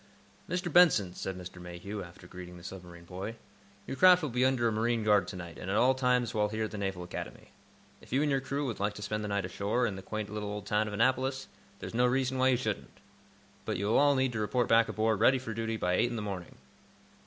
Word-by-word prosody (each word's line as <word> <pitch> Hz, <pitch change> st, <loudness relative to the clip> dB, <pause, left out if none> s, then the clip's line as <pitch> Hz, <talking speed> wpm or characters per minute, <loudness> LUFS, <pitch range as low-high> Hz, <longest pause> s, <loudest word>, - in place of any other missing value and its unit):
"Mr. 180 Hz, -2 st, -2 dB
Benson," 140 Hz, -, +5 dB
said 95 Hz, 0 st, -5 dB
Mr. 90 Hz, 0 st, -9 dB
Mayhew, 90 Hz, +4 st, -6 dB
after 90 Hz, 0 st, -12 dB
greeting 90 Hz, 0 st, -10 dB
the 85 Hz, -, -13 dB
submarine 90 Hz, -2 st, -9 dB
boy, 95 Hz, +6 st, -6 dB, 0.5 s
"your -, -, -5 dB
craft 180 Hz, +2 st, +6 dB
will 150 Hz, -, -2 dB
be 125 Hz, +2 st, +1 dB
under 130 Hz, -3 st, +3 dB
a -, -, +1 dB
marine 115 Hz, +1 st, 0 dB
guard 105 Hz, -4 st, +3 dB
to 95 Hz, -, -6 dB
night, 85 Hz, -2 st, -8 dB
and 95 Hz, -, -6 dB
at 100 Hz, -, +1 dB
all 130 Hz, +3 st, +5 dB
times 125 Hz, -2 st, +1 dB
while 105 Hz, -2 st, +1 dB
here 110 Hz, +1 st, -2 dB
at 110 Hz, -, -3 dB
the 105 Hz, -, -6 dB
Naval 95 Hz, -3 st, -3 dB
Academy. 90 Hz, -, -8 dB, 0.5 s
If -, -, -17 dB
you 135 Hz, +4 st, +2 dB
and 150 Hz, -, +1 dB
your 135 Hz, -1 st, +1 dB
crew 140 Hz, +2 st, -2 dB
would 120 Hz, -5 st, -4 dB
like 105 Hz, +1 st, -1 dB
to 105 Hz, -, -7 dB
spend 105 Hz, +1 st, -2 dB
the -, -, -3 dB
night 100 Hz, -2 st, -1 dB
ashore, 105 Hz, +6 st, 0 dB
in 105 Hz, -4 st, -2 dB
the -, -, -7 dB
quaint 110 Hz, +1 st, -5 dB
little 105 Hz, -1 st, -3 dB
old 105 Hz, -1 st, -5 dB
town 105 Hz, +1 st, +1 dB
of 105 Hz, -, -5 dB
Annapolis, 130 Hz, +4 st, +1 dB, 0.3 s
there's -, -, -8 dB
no 125 Hz, +2 st, +3 dB
reason 130 Hz, +1 st, 0 dB
why 130 Hz, -, +4 dB
you 130 Hz, -2 st, +4 dB
shouldn't. 110 Hz, -5 st, -4 dB, 0.7 s
But -, -, -2 dB
you 100 Hz, -, -2 dB
will 105 Hz, -, +3 dB
all 145 Hz, 0 st, +5 dB
need 130 Hz, -1 st, +1 dB
to 110 Hz, -, -2 dB
report 110 Hz, +3 st, 0 dB
back 115 Hz, 0 st, +4 dB
aboard, 110 Hz, -1 st, +1 dB
ready 130 Hz, +4 st, +5 dB
for 125 Hz, -3 st, -5 dB
duty, 115 Hz, 0 st, -2 dB
by 90 Hz, -3 st, 0 dB
eight 120 Hz, -, +2 dB
in 120 Hz, -, -4 dB
the 110 Hz, -, -3 dB
morning." 95 Hz, -4 st, -6 dB
110 Hz, 255 wpm, -30 LUFS, 95-125 Hz, 0.7 s, craft